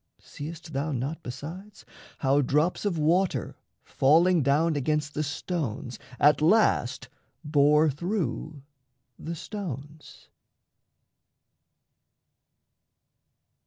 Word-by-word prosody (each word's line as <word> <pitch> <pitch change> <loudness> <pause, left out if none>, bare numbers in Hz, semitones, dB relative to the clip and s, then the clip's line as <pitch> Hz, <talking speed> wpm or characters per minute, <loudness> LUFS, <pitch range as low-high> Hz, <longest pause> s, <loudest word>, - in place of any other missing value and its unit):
Seest 160 +2 -9
thou 140 +3 -2
not, 140 +6 -3
Besides, 170 +11 -9 0.3
how 140 +1 +2
drops 150 +9 +1
of 190 -5 0
water 170 +5 +1 0.3
falling 165 +5 +3
down 150 +4 +2
Against 150 +1 -1
the 150 - -2
stones 145 - -4 0.2
at 150 +1 +5
last 215 +8 +2 0.4
bore 150 +1 +4
through 155 - -3 0.6
the 170 +1 -5
stones? 155 - -8
150 Hz, 85 wpm, -27 LUFS, 145-170 Hz, 0.6 s, at